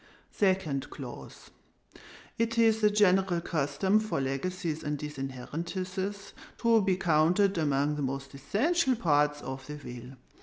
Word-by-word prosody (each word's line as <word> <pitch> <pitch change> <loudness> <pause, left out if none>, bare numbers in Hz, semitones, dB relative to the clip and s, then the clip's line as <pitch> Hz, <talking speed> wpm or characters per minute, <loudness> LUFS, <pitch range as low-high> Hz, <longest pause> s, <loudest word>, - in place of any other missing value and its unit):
"SECOND 185 -9 0
CLAUSE 130 -4 -10 0.9
It 230 0 0
is 225 -1 +4
the 210 - +5
general 195 -3 +3
custom 170 +6 +1
for 215 -9 -2
legacies 160 +4 -2
and 150 0 -2
disinheritances 170 +8 -5 0.2
to 230 -2 +4
be 190 -2 +2
counted 180 +3 +3
among 145 -1 +1
the - - -3
most 135 0 -4
essential 260 - +1
parts 150 -7 +2
of 130 0 -6
the 150 - -6
will. 125 -2 -9
165 Hz, 125 wpm, -29 LUFS, 140-200 Hz, 0.9 s, the